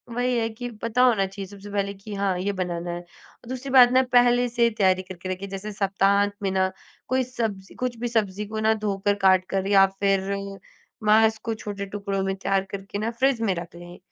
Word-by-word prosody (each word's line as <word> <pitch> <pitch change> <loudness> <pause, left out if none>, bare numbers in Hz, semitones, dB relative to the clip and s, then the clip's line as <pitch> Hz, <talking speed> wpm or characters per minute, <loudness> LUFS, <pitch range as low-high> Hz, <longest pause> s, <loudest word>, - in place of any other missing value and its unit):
वही 245 0 +1
है 225 0 0
कि 245 +2 -6
पता 230 +2 +1
होना 225 -6 +4
चाहिए 195 0 -7
सबसे 200 +1 -11
पहले 200 0 -1
कि 200 +2 -10
हाँ, 195 -2 0
ये 200 +3 -1
बनाना 175 -2 -3
है। 175 - -4
और 175 +6 -20
दूसरी 260 +1 -5
बात 250 -2 +8
ना 260 - +6
पहले 245 0 +5
से 235 0 +2
तैयारी 185 -2 +3
करके 185 0 -8
रखें। 185 +2 -4
जैसे 195 +2 -6
सप्ताहांत 200 +1 +2
में 195 - +1
ना 190 0 +1 0.4
कोई 260 0 +1
सब्ज़ी 220 -6 -4
कुछ 250 -2 -3
भी 240 - -2
सब्ज़ी 210 -3 -1
को 215 0 -4
ना 220 0 +3
धोकर, 205 -2 0
काट 190 -2 +4
कर, 195 0 -1
या 195 -1 +6
फिर 195 0 0 0.7
मांस 220 +1 +4
को 225 0 -4
छोटे 205 -2 -5
टुकड़ों 200 -1 -3
में 195 0 -1
तैयार 195 0 0
करके 200 +1 -6
ना, 225 +2 -1
फ्रिज 260 +1 +1
में 210 -4 +1
रख 170 0 -7
लें। 175 +1 -11
200 Hz, 210 wpm, -24 LUFS, 195-225 Hz, 0.7 s, बात